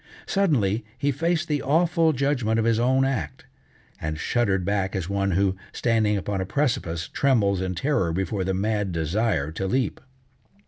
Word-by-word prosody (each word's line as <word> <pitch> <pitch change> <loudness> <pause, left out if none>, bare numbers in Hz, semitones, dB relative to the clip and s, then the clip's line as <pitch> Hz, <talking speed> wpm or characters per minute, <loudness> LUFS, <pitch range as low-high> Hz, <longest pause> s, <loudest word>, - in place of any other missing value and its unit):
Suddenly 120 - +1
he 140 +2 +1
faced 165 +4 0
the 150 -2 0
awful 165 +2 +3
judgment 130 -5 0
of 115 - +1
his 115 -1 +2
own 130 +2 +3
act, 135 -3 -3 0.6
and 75 0 -3
shuddered 100 -1 0
back 100 -1 -1
as 90 -3 -2
one 100 -1 0
who, 95 +1 +2 0.2
standing 110 -3 +1
upon 100 0 -2
a - - -2
precipice, 85 - -1
trembles 105 -9 +2
in 95 -1 -2
terror 120 - 0
before 95 +3 -1
the 95 0 -1
mad 105 0 -1
desire 80 -1 0
to 95 +4 -3
leap. 130 +6 -1
105 Hz, 165 wpm, -25 LUFS, 95-135 Hz, 0.6 s, awful